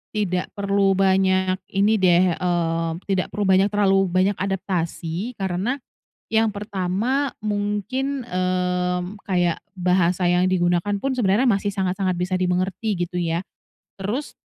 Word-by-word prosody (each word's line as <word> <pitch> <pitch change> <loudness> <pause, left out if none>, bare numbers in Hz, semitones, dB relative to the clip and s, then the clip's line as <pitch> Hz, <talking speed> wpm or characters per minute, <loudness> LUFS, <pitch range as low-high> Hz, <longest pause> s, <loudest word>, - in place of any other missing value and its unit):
tidak 185 -4 0
perlu 200 -1 +2
banyak 190 -1 +2 0.2
ini 205 +3 +3
deh, 180 -2 +4
eee, 165 -2 0 0.2
tidak 190 -2 0
perlu 205 -2 -1
banyak 190 +1 +5
terlalu 195 -2 +3
banyak 185 +2 +2
adaptasi 185 +2 -3
karena 195 +8 -1 0.5
yang 220 -1 +2
pertama 205 +7 -1
mungkin, 210 +6 -2
eee, 180 0 0 0.2
kayak 175 -3 0
bahasa 180 -1 +1
yang 180 +1 +3
digunakan 185 +2 +1
pun 270 +2 -1
sebenarnya 230 +2 +3
masih 200 -2 +1
sangat 190 -2 -1
sangat 190 -2 0
bisa 185 +1 0
dimengerti 185 +2 -1
gitu 180 - -7
ya. 170 -1 0 0.6
Terus, 210 +9 -4
190 Hz, 130 wpm, -22 LUFS, 180-205 Hz, 0.6 s, banyak